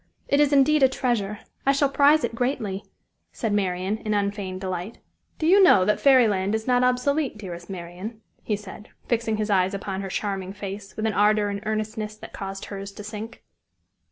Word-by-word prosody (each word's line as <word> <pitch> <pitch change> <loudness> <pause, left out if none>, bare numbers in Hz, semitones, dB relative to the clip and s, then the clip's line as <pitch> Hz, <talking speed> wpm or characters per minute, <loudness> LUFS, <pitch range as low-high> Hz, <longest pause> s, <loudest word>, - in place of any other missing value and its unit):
It 280 - +2
is 295 -1 +4
indeed 290 +2 +4
a 265 - +6
treasure. 220 -6 -1 0.2
I 275 - +4
shall 280 +1 +3
prize 285 +2 +4
it 235 - -1
greatly," 230 -5 -2 0.5
said 225 -3 -2
Marian, 190 0 0
in 215 -2 -1
unfeigned 200 -2 -2
delight. 185 +3 -4 0.4
"Do 315 - -2
you 385 +5 +6
know 205 - +6
that 210 - +2
Fairy 260 -4 +6
Land 200 0 0
is 220 0 -3
not 250 -1 +3
obsolete, 250 +1 +1
dearest 175 -4 -8
Marian?" 185 +4 -7 0.2
he 210 - -1
said, 205 +1 -10 0.2
fixing 230 -2 0
his 215 0 -1
eyes 190 0 +2
upon 195 -1 -4
her 195 - -5
charming 195 -1 -3
face 200 0 -7
with 215 - -2
an 220 - +1
ardor 210 +1 +3
and 200 0 -4
earnestness 215 0 -3
that 215 - -12
caused 195 0 -6
hers 200 0 -7
to 210 - -9
sink. 215 +3 -8
210 Hz, 190 wpm, -25 LUFS, 195-245 Hz, 0.5 s, a